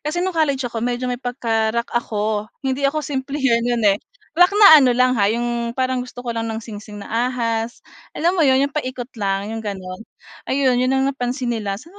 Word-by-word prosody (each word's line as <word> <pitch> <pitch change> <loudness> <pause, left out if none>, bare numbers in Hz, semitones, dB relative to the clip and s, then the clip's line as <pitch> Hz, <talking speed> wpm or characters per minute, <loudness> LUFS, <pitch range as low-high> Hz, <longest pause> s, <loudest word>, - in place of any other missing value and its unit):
kasi 340 +5 -2
no'ng 375 - -1
college 285 -5 0
ako 235 -2 -4
medyo 245 +1 -2
may 250 -1 -3
pagka-rock 235 -2 -1
ako, 215 -2 -1 0.2
hindi 270 +1 +1
ako 305 +1 -3
simplehan 270 -3 0
'yan, 235 -2 0
eh, 200 0 +3 0.3
rock 355 +3 +6
na 395 -8 +9
ano 250 -3 +3
lang 255 0 +4
ha, 200 - +4
'yong 235 +1 -2
parang 260 -1 0
gusto 245 0 -9
ko 235 - -2
lang 230 0 -3
ng 220 - -3
singsing 210 -2 -9
na 235 +4 0
ahas, 230 -2 -3 0.3
alam 340 +3 +2
mo 370 - 0
'yon 270 -2 +4
yung 280 - -4
paikot 255 -4 -4
lang, 200 +1 -1
yung 225 - -4
gano'n. 190 -3 -6 0.5
Ayun 260 -2 +2
'yon 255 - +1
ang 265 - +2
napansin 250 -1 -2
nila 205 -4 -3
saan 320 - -14
245 Hz, 205 wpm, -20 LUFS, 225-270 Hz, 0.5 s, na